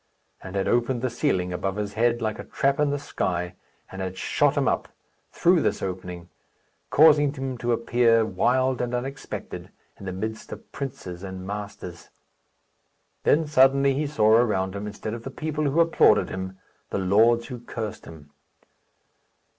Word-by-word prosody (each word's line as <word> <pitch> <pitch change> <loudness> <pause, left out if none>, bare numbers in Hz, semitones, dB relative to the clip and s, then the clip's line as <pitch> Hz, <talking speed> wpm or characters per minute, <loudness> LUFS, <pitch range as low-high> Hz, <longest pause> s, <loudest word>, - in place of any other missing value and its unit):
and 95 0 -8
had 95 - 0
opened 120 +1 +1
the 130 - 0
ceiling 95 -9 0
above 95 +2 -2
his 105 -1 -3
head, 120 +1 +1
like 110 +1 -2
a - - -5
trap 140 +1 0
in 150 -1 +3
the 145 - 0
sky, 90 -9 -3 0.4
and 95 - -6
had 95 0 -4
shot - - +1
him - - +2
up, - - 0 0.4
through - - +3
this - - -1
opening, 90 -2 -5 0.6
causing 150 -2 +6
him 135 -2 -4
to 120 0 -2
appear, 115 -1 +3
wild, 125 +6 +1
and 125 0 -2
unexpected, 135 +3 -6 0.3
in 100 - -8
the - - -2
midst 110 +4 -5
of - - -10
princes 95 -10 -6
and 95 -1 -7
masters. 100 -4 -7 1.2
Then 160 +2 +4
suddenly 135 -1 +4
he 145 +2 -1
saw 110 -7 +3
around 105 -5 +3
him, 100 +1 -4
instead 105 +1 -6
of 115 - -6
the 135 - -6
people 155 +1 -3
who 145 +3 +1
applauded 165 -10 +4
him, 95 0 -5 0.3
the - - -2
lords 115 +5 +3
who 125 - -6
cursed 115 -3 -6
him. 75 -3 -13
115 Hz, 165 wpm, -25 LUFS, 95-130 Hz, 1.2 s, causing